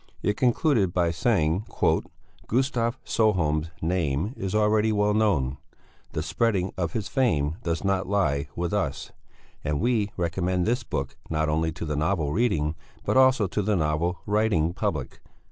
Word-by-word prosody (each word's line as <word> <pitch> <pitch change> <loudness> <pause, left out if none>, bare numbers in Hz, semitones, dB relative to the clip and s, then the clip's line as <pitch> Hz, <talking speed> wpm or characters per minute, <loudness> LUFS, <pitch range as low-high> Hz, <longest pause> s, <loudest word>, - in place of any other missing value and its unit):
It 105 - +1
concluded 120 - +2
by 85 -2 +2
saying: 90 0 +1 0.8
"Gustav 120 -1 0
Sjöholm's 80 -8 +1
name 85 - 0
is 95 -4 -3
already 110 +1 +3
well 105 0 +2
known; 85 -12 +1 0.6
the 80 - -2
spreading 95 +2 0
of 85 -3 -2
his 105 -3 -2
fame 80 - +1
does 85 +1 -2
not 95 -1 0
lie 70 -9 +1
with 85 0 -2
us; - - -2 0.5
and 75 -1 -1
we 110 -2 +1
recommend 90 +1 0
this 120 +2 +1
book 70 - -4
not 80 0 0
only 80 +1 +1
to 85 - -5
the 75 -1 -2
novel 80 -1 0
reading, 80 -9 +1 0.3
but - - +1
also 130 -4 +5
to 100 +3 -1
the 105 +1 +1
novel 85 +2 0
writing 105 -6 +1
public." - - -3
95 Hz, 150 wpm, -26 LUFS, 80-110 Hz, 0.8 s, also